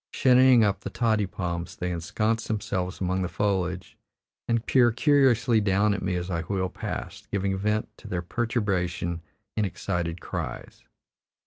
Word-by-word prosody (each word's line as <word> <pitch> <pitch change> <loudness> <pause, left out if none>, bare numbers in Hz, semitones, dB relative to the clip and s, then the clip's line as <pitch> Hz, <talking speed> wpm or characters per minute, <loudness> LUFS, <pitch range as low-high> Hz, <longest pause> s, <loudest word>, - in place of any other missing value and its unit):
Shinnying 130 -2 +6
up 100 -2 +1
the - - -6
toddy 110 -4 +1
palms, 90 0 -4
they 90 -4 -3
ensconce 110 +7 -1
themselves 100 -4 -2
among 95 0 0
the 90 - 0
foliage 95 -3 -1 0.5
and 115 0 0
peer 120 -3 +4
curiously 125 -3 +3
down 100 +1 +2
at 100 - -3
me 90 -1 -1
as 90 +1 -3
I 85 -1 -1
wheel 95 +1 -2
past, - - -6
giving 100 -1 0
vent 105 +2 0
to - - -11
their 90 -1 -3
perturbation 90 -6 -1 0.3
in 110 - +1
excited 90 -3 -2
cries. - - -6
100 Hz, 150 wpm, -26 LUFS, 90-110 Hz, 0.5 s, Shinnying